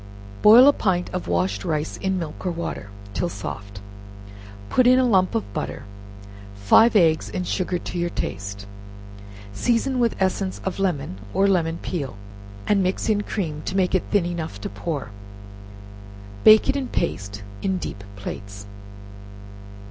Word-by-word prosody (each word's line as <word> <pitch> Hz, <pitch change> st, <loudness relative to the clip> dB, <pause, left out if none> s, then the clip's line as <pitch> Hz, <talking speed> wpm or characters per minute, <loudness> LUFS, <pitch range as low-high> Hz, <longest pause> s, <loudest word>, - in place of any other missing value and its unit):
Boil 235 Hz, +5 st, +9 dB
a 285 Hz, -, +7 dB
pint 180 Hz, -7 st, 0 dB
of 180 Hz, -, -4 dB
washed 95 Hz, +3 st, 0 dB
rice 155 Hz, -1 st, -2 dB
in 190 Hz, -1 st, -1 dB
milk 165 Hz, -4 st, -6 dB
or 180 Hz, -, -1 dB
water, 165 Hz, -11 st, -5 dB, 0.2 s
till 175 Hz, -, -1 dB
soft, 100 Hz, -, -7 dB, 0.9 s
put 245 Hz, -, +3 dB
in 255 Hz, +1 st, +6 dB
a 260 Hz, -, +4 dB
lump 190 Hz, -6 st, +2 dB
of 100 Hz, -2 st, -3 dB
butter, -, -, -4 dB, 0.7 s
five 160 Hz, -, +5 dB
eggs, 160 Hz, -5 st, +3 dB
and 180 Hz, -, -3 dB
sugar 180 Hz, -1 st, -1 dB
to 175 Hz, 0 st, -5 dB
your 175 Hz, 0 st, 0 dB
taste, 100 Hz, -, -5 dB, 0.9 s
season 245 Hz, -, 0 dB
with 235 Hz, -2 st, +2 dB
essence 190 Hz, 0 st, -1 dB
of 190 Hz, 0 st, -3 dB
lemon, 145 Hz, -, -1 dB, 0.2 s
or 195 Hz, -, +4 dB
lemon 170 Hz, -4 st, +1 dB
peel, 140 Hz, -, -4 dB, 0.5 s
and 205 Hz, -1 st, +3 dB
mix 185 Hz, +4 st, -1 dB
in 210 Hz, -1 st, +2 dB
cream 160 Hz, -8 st, -4 dB
to 190 Hz, -, -3 dB
make 185 Hz, -1 st, +1 dB
it 185 Hz, -, +3 dB
thin 205 Hz, -4 st, +2 dB
enough 165 Hz, -11 st, -4 dB
to -, -, -4 dB
pour, 125 Hz, +1 st, -5 dB, 1.3 s
bake 215 Hz, 0 st, +8 dB
it -, -, +2 dB
in 275 Hz, -2 st, -2 dB
paste, 100 Hz, -, -3 dB, 0.2 s
in 190 Hz, -1 st, 0 dB
deep 100 Hz, -, -6 dB
plates. 100 Hz, 0 st, -8 dB
175 Hz, 155 wpm, -23 LUFS, -, 1.3 s, Boil